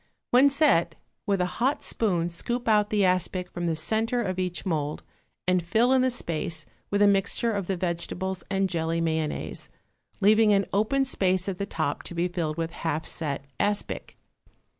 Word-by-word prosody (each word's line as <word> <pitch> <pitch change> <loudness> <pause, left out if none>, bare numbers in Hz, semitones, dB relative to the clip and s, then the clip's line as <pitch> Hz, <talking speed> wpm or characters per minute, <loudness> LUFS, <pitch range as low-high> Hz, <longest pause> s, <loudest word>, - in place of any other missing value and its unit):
When 260 +3 +6
set, 270 - +3 0.3
with 200 -2 +1
a - - +2 0.2
hot 270 +4 +1
spoon 180 -7 0
scoop 240 +8 -3
out 210 -2 +3
the 205 -2 +2
aspic 180 0 0
from 175 0 -3
the 165 - 0
centre 220 +9 0
of 185 -2 -3
each 180 0 -3
mould 155 -4 -2 0.4
and 180 0 +3
fill 225 +9 +3
in 260 - +4
the 260 - +3
space 165 -8 -2 0.2
with 205 0 +2
a - - +6
mixture 200 +4 +2
of 200 -4 -2
the 190 - -1
vegetables 180 +2 -3
and 195 -1 +1
jelly 165 -1 -1
mayonnaise, 160 -2 -2 0.5
leaving 215 +1 +5
an 195 -1 +3
open 245 +7 +2
space 185 -7 +1
at 190 -2 -3
the 200 - -2
top 155 -6 -2
to 175 - -8
be 170 +1 +1
filled 170 -3 -3
with 165 0 -2
half 160 -1 -3
set 140 -4 -2
aspic. 205 0 -1
185 Hz, 180 wpm, -26 LUFS, 170-210 Hz, 0.5 s, When